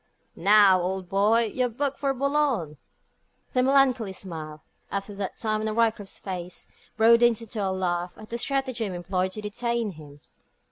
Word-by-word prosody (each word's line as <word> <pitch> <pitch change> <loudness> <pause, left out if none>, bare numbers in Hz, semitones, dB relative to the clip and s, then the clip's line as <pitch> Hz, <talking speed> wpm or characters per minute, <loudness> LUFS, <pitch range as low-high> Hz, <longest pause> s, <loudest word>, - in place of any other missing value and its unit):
"Now, 200 -1 +6
old 185 0 -3
boy! 215 +3 +3
You're 250 -1 +1
booked 275 +4 -2
for 275 -1 +1
Boulogne." 270 - 0 0.7
The 255 - +2
melancholy 255 -6 +3
smile, 155 -5 -7 0.3
up 200 0 -1
to 205 - -10
that 195 -1 -5
time 215 -1 -1
on 215 0 -2
Ryecroft's 225 -3 0
face, 180 -2 -6 0.3
broadens 230 0 +5
into 225 -2 -5
a 195 - 0
laugh 180 -2 -2
at 215 +1 -13
the 235 - -2
stratagem 255 -7 -2
employed 185 +1 -2
to 215 - -4
detain 235 +1 -2
him. 150 -3 -13
215 Hz, 155 wpm, -26 LUFS, 185-235 Hz, 0.7 s, Now